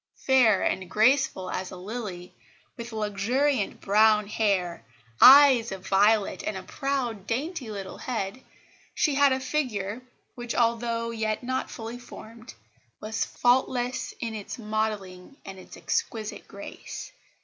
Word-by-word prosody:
Fair 245 -7 +4
and 185 -2 -1
graceful 225 -4 +2
as 185 0 -4
a - - -9
lily, 190 -3 -7 0.4
with 235 -1 -8
luxuriant 220 +4 0
brown 210 +1 +4
hair, 195 - -1 0.4
eyes 265 -4 +8
of 190 -1 -7
violet, 205 +1 +3
and 205 - -3
a 185 - -7
proud, 240 -3 -3
dainty 275 +1 -3
little 200 -3 -7
head, 225 -1 -4 0.5
she 300 - +2
had 285 0 +4
a 260 - +1
figure 245 -6 -2 0.3
which, 240 -1 -5
although 230 0 0
yet 220 0 -2
not 260 +1 -2
fully 230 +1 -7
formed, 230 -1 -12 0.4
was 220 +1 -2
faultless 245 0 0
in 230 -2 -4
its 210 -2 -6
modelling 215 -1 -4
and 190 -1 -9
its - - -12
exquisite 215 -2 -3
grace. - - -9
225 Hz, 130 wpm, -26 LUFS, 200-250 Hz, 0.5 s, eyes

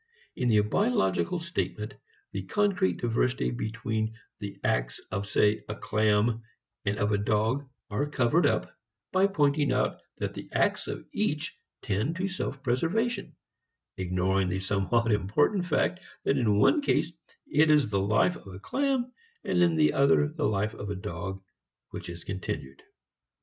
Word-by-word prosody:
In 125 - 0
the 110 -3 +5
biological 105 - +1
statement 165 -10 -3 0.4
the 95 - -3
concrete 200 - +2
diversity 120 +2 0
between 110 -1 -2 0.2
the 100 -1 -7
acts - - 0
of 100 +1 -2
say 105 +1 +3
a 105 - -3
clam 110 +2 +2 0.4
and 105 0 0
of 105 0 +1
a 105 - +2
dog 110 +7 0 0.2
are 140 +9 0
covered 145 +4 +3
up - - -1 0.4
by 190 +1 +4
pointing 145 -6 +2
out - - 0 0.2
that - - -3
the - - -8
acts - - +1
of - - -5
each - - -1 0.3
tend 105 +11 0
to 185 +3 -1
self 165 -7 -4
preservation, 175 - 0 0.6
ignoring 95 +1 0
the 95 +1 -1
somewhat 100 +5 +1
important 145 - +2
fact 180 +2 +1 0.2
that 140 - +2
in 110 -6 +2
one 295 - +5
case 170 - +1 0.3
it 155 +1 +3
is 150 -8 +4
the 100 - +2
life 110 - +3
of - - -16
a - - -9
clam 265 - 0 0.3
and - - +1
in 170 -2 +4
the 155 -1 +4
other 140 +2 +4
the 155 -1 -1
life 105 +1 0
of 105 - -6
a 100 - -2
dog 95 +1 -5 0.5
which - - -7
is 85 -1 -8
continued. 80 -8 -5
115 Hz, 155 wpm, -28 LUFS, 100-155 Hz, 0.6 s, the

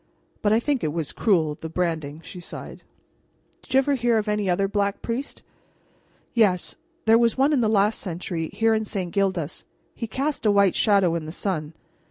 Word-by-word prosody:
But 205 - +2
I 220 - +5
think 280 +1 -1
it 155 -2 -1
was 160 -3 -2
cruel, 160 -8 +1
the 160 - -5
branding," 160 -3 -2
she 180 - -9
sighed. 175 - -9 0.8
"Did - - -19
you 260 - +4
ever 270 +1 +3
hear 240 -3 +2
of 215 0 -1
any 210 -2 0
other 195 +2 +2
Black 200 0 -1
Priest?" 240 +5 -4 0.9
"Yes. 200 -7 +2 0.3
There 225 +1 +6
was 235 0 +2
one 275 +3 +3
in 270 - +3
the 220 - +2
last 210 0 +2
century, 170 -2 -4
here 225 0 +2
in 220 0 +1
St. 190 -4 -4
Gildas. 185 -6 -1 0.3
He 230 - -5
cast 275 +6 -2
a 215 - +3
white 200 -2 +4
shadow 200 -5 +3
in 165 -2 -3
the - - -5
sun. 160 -4 -3
200 Hz, 195 wpm, -24 LUFS, 170-225 Hz, 0.9 s, There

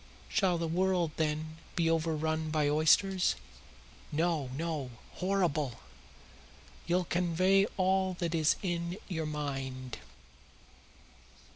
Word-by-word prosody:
Shall 190 -4 +2
the 165 0 -1
world, 180 -1 +1
then, 155 0 -1 0.2
be 170 -2 +2
overrun 160 -1 0
by 155 -1 +1
oysters? 175 +5 +4 0.8
No, 160 -3 0
no; 155 -5 -2 0.3
horrible! 170 -9 0 1.1
You'll 180 +1 +2
convey 185 +3 +3
all 190 0 +2
that 175 -2 -2
is 160 -2 +3
in 175 0 -2
your 160 -4 -2
mind." 135 - -4
165 Hz, 100 wpm, -31 LUFS, 155-180 Hz, 1.1 s, oysters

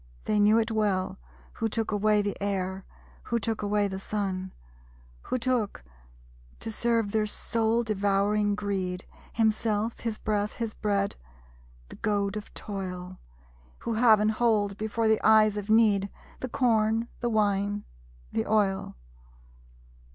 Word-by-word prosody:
They 210 -1 +2
knew 210 +2 +5
it 225 0 +1
well, 205 - 0 0.3
who 225 - -1
took 225 0 -2
away 210 0 +3
the 205 -1 -2
air, 190 -1 -2 0.4
Who 235 - 0
took 225 0 -2
away 205 0 +1
the 190 -1 -5
sun; 190 -2 -3 0.7
Who - - -1
took, 240 - -1 0.8
to 225 - -4
serve 230 -2 +1
their 215 0 +1
soul 230 +2 0
devouring 205 0 +1
greed, 190 -3 -2 0.3
Himself, 220 0 +1
his 225 -2 -3
breath, 210 -1 -1
his 230 -2 -4
bread 200 -1 -1 0.7
the - - -11
goad 205 -2 0
of 210 0 -6
toil; 185 -3 -6 0.6
Who 230 - -2
have 220 -1 +5
and 215 +1 +3
hold, 215 -3 +1
before 220 +2 -1
the 220 0 +3
eyes 215 -1 +6
of 205 0 -5
Need, 210 -3 +4 0.3
The 255 - -4
corn, 225 -2 +2
the 240 - -1
wine, 205 -1 +1 0.5
the 110 - -1
oil! 200 -3 +1
210 Hz, 135 wpm, -28 LUFS, 200-220 Hz, 0.8 s, eyes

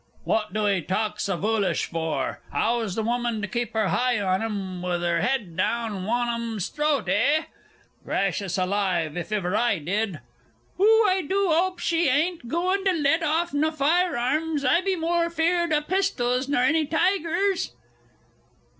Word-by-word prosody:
What 215 -1 0
do 215 -1 0
'ee 195 -3 +1
taak 210 +5 -2
so 195 -3 -1
voolish 210 +1 0
vor? 160 -5 -2
How's 220 +5 0
th' 220 - -1
wumman 240 -1 -1
to - - -1
kip 235 +2 -3
'er 215 -3 +1
heye 245 -2 +1
on 190 -1 0
'em, 195 -5 -4
with 175 -1 -2
'er 170 -1 +1
'ed 210 -5 -1
down 210 0 -1
wan 240 +3 0
on 235 0 -2
'em's 225 -5 -3
throat, 300 -4 0
eh?... 290 +9 +2 0.6
Gracious 195 -1 -1
alive! 185 -4 0
if 175 +3 -5
iver 200 -2 -1
I 235 -4 +2
did!... 190 +2 -2 0.6
Oh, 440 +2 +5
I 375 0 +2
do 385 +4 0
'ope 365 +3 +1
she 335 -1 +1
bain't 300 +1 0
gooin' 365 +7 0
to 380 - +3
let 320 0 +2
off 325 +2 0
naw 300 +2 +2
fire 320 +2 +1
arms, 295 +4 -1
I 340 - +4
be 385 0 0
moor 340 0 0
fear'd 340 +1 +1
o' 300 -1 +2
pistols 275 -9 0
nor 280 -3 +1
any 310 +2 +2
tigers.... 365 +3 0
245 Hz, 170 wpm, -25 LUFS, 205-330 Hz, 0.6 s, Oh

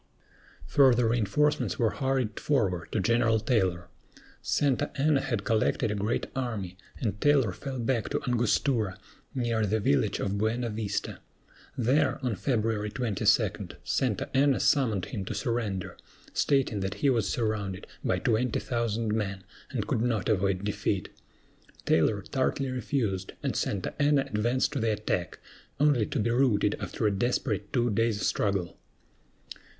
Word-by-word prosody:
Further 125 - +4
reinforcements 120 +6 +1
were 115 -4 +2
hurried 130 -5 -1
forward 95 - 0
to - - 0
General 115 +2 +3
Taylor. 95 -6 0 0.5
Santa 140 -4 +1
Anna 145 -1 +3
had 115 -7 -2
collected 110 -1 +1
a - - 0
great 105 +3 -1
army, 110 -9 -3 0.2
and 105 -3 -2
Taylor 140 -8 +4
fell 130 +8 -6
back 120 -1 -1
to - - -1
Angostura, 120 -3 +1 0.4
near 120 -3 0
the 105 +2 +1
village 130 -1 +1
of 100 0 -1
Buena 115 +2 0
Vista. 105 -2 -3 0.6
There, 130 +3 +2
on 120 -4 0
February 110 -3 0
22, 115 -4 -2 0.6
Santa - - 0
Anna 135 0 +4
summoned 115 - +2
him 105 -6 -5
to - - -4
surrender, 110 -6 -2 0.4
stating 135 -7 +1
that 95 0 -3
he 140 - +6
was 115 -6 +1
surrounded 105 -5 -2 0.2
by - - +1
twenty 115 +1 +1
thousand 115 -3 -1
men 100 -3 -2 0.3
and 115 -6 -2
could 110 +1 0
not 115 -6 0
avoid 100 -2 +1
defeat. 105 0 -1 0.8
Taylor 100 +5 +2
tartly 135 +2 -1
refused, 115 -7 -2
and - - -1
Santa 95 -3 -2
Anna 145 -1 +4
advanced 120 +7 0
to 140 - -1
the 110 -1 +1
attack, 105 -4 -2 0.4
only 140 -8 +3
to - - -3
be 115 +2 +1
routed 115 -5 +2
after 100 +2 -3
a 105 - +4
desperate 105 -1 -1
two 120 -2 +1
days' 110 0 +1
struggle. 100 -4 -1
115 Hz, 145 wpm, -28 LUFS, 105-130 Hz, 0.8 s, he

